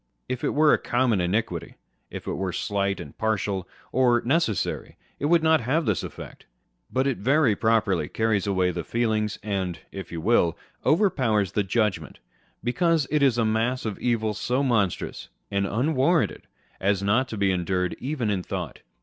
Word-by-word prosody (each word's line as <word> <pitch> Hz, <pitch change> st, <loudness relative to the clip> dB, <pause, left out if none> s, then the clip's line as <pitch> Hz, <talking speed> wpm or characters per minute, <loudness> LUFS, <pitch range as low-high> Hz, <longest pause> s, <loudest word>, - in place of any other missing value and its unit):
If 130 Hz, -, -4 dB
it -, -, 0 dB
were 150 Hz, 0 st, +5 dB
a -, -, +3 dB
common 120 Hz, -5 st, +1 dB
iniquity, 90 Hz, -2 st, -2 dB, 0.3 s
if -, -, -8 dB
it -, -, -3 dB
were 95 Hz, -1 st, -2 dB
slight 100 Hz, +2 st, -1 dB
and 70 Hz, -, -9 dB
partial, 100 Hz, -3 st, -1 dB, 0.2 s
or 125 Hz, -2 st, +4 dB
necessary, 135 Hz, -, 0 dB, 0.2 s
it -, -, -2 dB
would 165 Hz, +1 st, +4 dB
not 160 Hz, -3 st, +4 dB
have 150 Hz, +8 st, 0 dB
this 105 Hz, -8 st, +1 dB
effect; -, -, -9 dB, 0.4 s
but 130 Hz, +1 st, +1 dB
it 135 Hz, -7 st, 0 dB
very 135 Hz, 0 st, +3 dB
properly 110 Hz, -4 st, +1 dB
carries 110 Hz, -3 st, 0 dB
away 95 Hz, -2 st, +2 dB
the 85 Hz, -1 st, -4 dB
feelings, 110 Hz, -2 st, 0 dB
and 95 Hz, -4 st, -2 dB
(if 95 Hz, -2 st, -8 dB
you 85 Hz, -, -4 dB
will) 85 Hz, -3 st, +2 dB, 0.3 s
overpowers 130 Hz, -, +2 dB
the 105 Hz, -, +1 dB
judgment, 105 Hz, 0 st, -1 dB, 0.5 s
because 165 Hz, +4 st, +2 dB
it 150 Hz, -1 st, +2 dB
is 135 Hz, -4 st, +4 dB
a 115 Hz, -, +2 dB
mass 115 Hz, +4 st, 0 dB
of 105 Hz, -3 st, -3 dB
evil 110 Hz, -3 st, 0 dB
so 125 Hz, +6 st, -1 dB
monstrous 115 Hz, -9 st, -1 dB, 0.2 s
and 100 Hz, 0 st, 0 dB
unwarranted 145 Hz, -, +1 dB, 0.3 s
as 100 Hz, 0 st, +1 dB
not 110 Hz, +7 st, +2 dB
to 110 Hz, -, -6 dB
be 100 Hz, -1 st, +2 dB
endured 90 Hz, 0 st, -1 dB
even 130 Hz, -5 st, -2 dB
in 95 Hz, -2 st, 0 dB
thought. -, -, -5 dB
110 Hz, 170 wpm, -25 LUFS, 100-130 Hz, 0.5 s, were